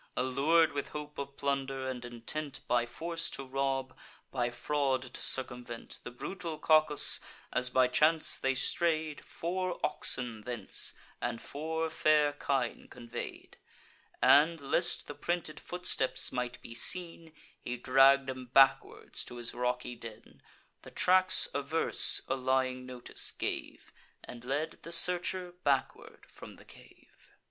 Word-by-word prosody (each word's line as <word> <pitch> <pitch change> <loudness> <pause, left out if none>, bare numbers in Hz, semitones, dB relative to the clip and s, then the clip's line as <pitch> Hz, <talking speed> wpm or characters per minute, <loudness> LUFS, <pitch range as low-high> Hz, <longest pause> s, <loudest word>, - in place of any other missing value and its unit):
Allur'd 140 +6 +3
with 140 -1 -3
hope 150 -1 -7
of 140 0 -6
plunder, 135 -1 -2
and 125 -2 -4
intent 120 +5 -4
By 120 -1 +2
force 165 +6 -3
to 135 - -4
rob, 135 0 -2 0.4
by 120 -2 0
fraud 135 +1 0
to 130 - -7
circumvent, 120 -3 -4
The - - -6
brutal 165 +6 -6
Cacus, 155 -1 +4 0.3
as 125 0 +2
by 130 0 +4
chance 155 +5 +3
they 135 0 +1
stray'd, 155 +2 0
Four 180 +1 -3
oxen 125 -6 +1
thence, 115 -3 -4 0.3
and 120 -1 -2
four 160 +2 -3
fair 150 -1 +3
kine 135 -4 -2
convey'd; 120 -1 -8 0.7
And, 160 +3 +6
lest 140 -1 +2
the - - -7
printed 160 +1 -3
footsteps 180 -7 -1
might 125 0 -3
be 115 - -8
seen, 165 +5 -2 0.3
He 125 - -5
dragg'd 135 +2 +5
'em 130 -1 -5
backwards 135 +2 +3
to - - -9
his 120 -1 -3
rocky 125 0 -2
den. 115 -2 -11 0.4
The - - -11
tracks 185 0 +5
averse 140 +4 +2
a 135 - 0
lying 130 -1 0
notice 125 -1 -4
gave, - - -5 0.3
And 120 -1 -10
led 145 +5 -2
the 165 - -9
searcher 180 +1 0
backward 140 -2 -1
from - - -12
the - - -17
cave. - - -19
135 Hz, 135 wpm, -31 LUFS, 125-155 Hz, 0.7 s, And